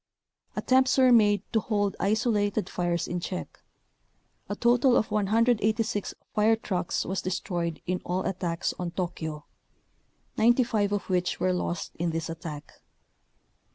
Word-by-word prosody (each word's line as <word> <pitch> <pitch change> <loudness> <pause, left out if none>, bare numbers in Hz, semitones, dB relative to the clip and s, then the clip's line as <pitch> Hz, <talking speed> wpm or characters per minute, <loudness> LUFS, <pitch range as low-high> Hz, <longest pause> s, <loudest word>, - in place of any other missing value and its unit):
Attempts 260 +1 +3
were 260 -1 +6
made 205 -4 +5
to 225 - +4
hold 205 -3 -1
isolated 210 0 +1
fires 175 -1 -1
in 175 - -2
check. 180 +1 -6 0.9
A 205 - -2
total 240 +3 +4
of 220 - 0
186 215 0 +1 0.2
fire 215 +1 +4
trucks 185 -5 -2
was 190 +2 -2
destroyed 175 -3 -3
in 180 0 -2
all 180 +1 -2
attacks 175 -2 -2
on 180 -1 -2
Tokyo, 160 -4 -4 0.9
95 230 -3 +3
of 205 - -2
which 180 -1 0
were 185 +1 +2
lost 175 -1 -3
in 170 0 0
this 165 0 -3
attack. 160 -3 -8
200 Hz, 130 wpm, -27 LUFS, 175-220 Hz, 0.9 s, were